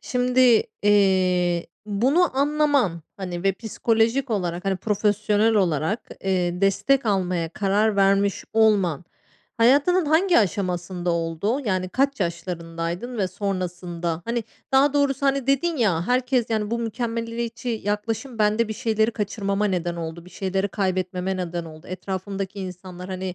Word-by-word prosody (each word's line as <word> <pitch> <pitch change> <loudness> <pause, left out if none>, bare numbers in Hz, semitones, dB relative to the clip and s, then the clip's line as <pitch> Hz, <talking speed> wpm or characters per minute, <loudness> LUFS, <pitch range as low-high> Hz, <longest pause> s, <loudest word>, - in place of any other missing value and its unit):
şimdi, 250 - +3 0.2
eee, 185 -4 +3 0.2
bunu 260 - +2
anlaman, 285 - +2
hani, 180 -3 -5
ve 195 0 +3
psikolojik 225 +5 0
olarak 180 -4 -2
hani, 195 -1 0
profesyonel 210 +2 +1
olarak, 180 - 0
eee, 180 -2 0
destek 230 +6 +2
almaya 180 -4 0
karar 205 +4 +1
vermiş 195 0 +2
olman 200 -7 +3 0.5
hayatının 290 +9 +4
hangi 340 +4 +4
aşamasında 180 -3 -1
oldu? 170 - -1
Yani, 185 -4 -1
kaç 270 +5 0
yaşlarındaydın 170 +4 -4
ve 190 -2 +1
sonrasında? 180 -3 -3
Hani, 235 -1 -2 0.3
daha 270 +1 +5
doğrusu, 280 -1 +1
hani, 275 -1 +1
dedin 290 +5 +1
ya, 185 - +1
"Herkes, 250 -1 +1
yani, 215 -1 -1
bu 235 - 0
mükemmeliyetçi 230 0 -3 0.2
yaklaşım 225 +4 -3
bende 215 +1 +2
bir - - -2
şeyleri 220 -1 +1
kaçırmama 205 -2 -2
neden 175 -4 -1
oldu, 165 0 -6
bir 180 - -14
şeyleri 190 +1 -2
kaybetmeme 185 -1 -1
neden 175 -2 -3
oldu. 155 +1 -12
Etrafımdaki 195 +1 -5
insanlar, 180 0 -8
hani, 185 -1 -4
200 Hz, 130 wpm, -23 LUFS, 180-230 Hz, 0.5 s, daha